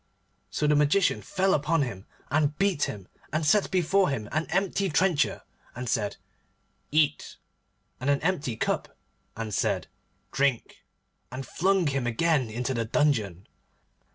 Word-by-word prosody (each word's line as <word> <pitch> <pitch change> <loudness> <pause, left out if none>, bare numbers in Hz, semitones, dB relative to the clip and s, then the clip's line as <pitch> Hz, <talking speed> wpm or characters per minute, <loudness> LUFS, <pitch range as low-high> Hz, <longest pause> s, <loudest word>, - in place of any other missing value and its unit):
So 125 +10 -1
the 150 0 +4
Magician 150 +6 +3
fell 190 -1 +1
upon 150 +1 +2
him, 110 -6 -6 0.2
and 150 0 +1
beat 195 -7 +2
him, 100 -3 -7 0.2
and 155 0 0
set 200 +6 +3
before 190 +1 +2
him 115 -7 -3
an 155 +2 -1
empty 195 +2 0
trencher, 165 -1 +1 0.3
and 125 +1 -5
said, 105 -3 -1 0.7
'Eat,' 150 -1 +1 0.6
and 130 +2 -1
an 140 -1 +3
empty 160 -9 0
cup, - - -2 0.4
and 110 -2 -4
said, - - 0 0.5
'Drink,' 135 -4 0 0.5
and 130 +1 -6
flung 190 0 +1
him 135 -4 0
again 135 +1 +1
into 125 +4 -2
the 115 -2 -1
dungeon. 110 - 0
145 Hz, 140 wpm, -27 LUFS, 125-170 Hz, 0.7 s, the